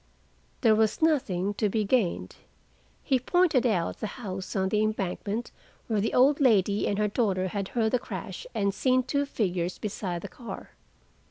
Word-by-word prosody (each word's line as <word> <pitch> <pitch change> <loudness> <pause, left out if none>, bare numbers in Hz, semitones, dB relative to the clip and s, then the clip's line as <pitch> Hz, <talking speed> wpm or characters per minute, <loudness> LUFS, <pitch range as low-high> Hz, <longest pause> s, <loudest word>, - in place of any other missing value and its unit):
There 225 -3 +5
was 215 0 +2
nothing 205 - +1
to 210 0 0
be 215 +1 0
gained. 205 -5 0 0.7
He 265 -3 +2
pointed 300 -3 +3
out 180 -7 0
the 215 - -2
house 195 -5 -6
on 190 -1 +1
the 210 +1 +1
embankment 215 +1 -2 0.3
where 215 -3 0
the 220 - -1
old 275 +3 +5
lady 210 -6 +3
and 200 - 0
her 210 0 +2
daughter 195 -4 0
had 195 0 -3
heard 220 -1 0
the 250 - +2
crash - - -7
and 200 -1 +1
seen 255 +4 +2
two 280 +2 -1
figures 180 -8 -1
beside 185 -5 -4
the - - -4
car. 235 -6 -9
215 Hz, 170 wpm, -27 LUFS, 195-250 Hz, 0.7 s, There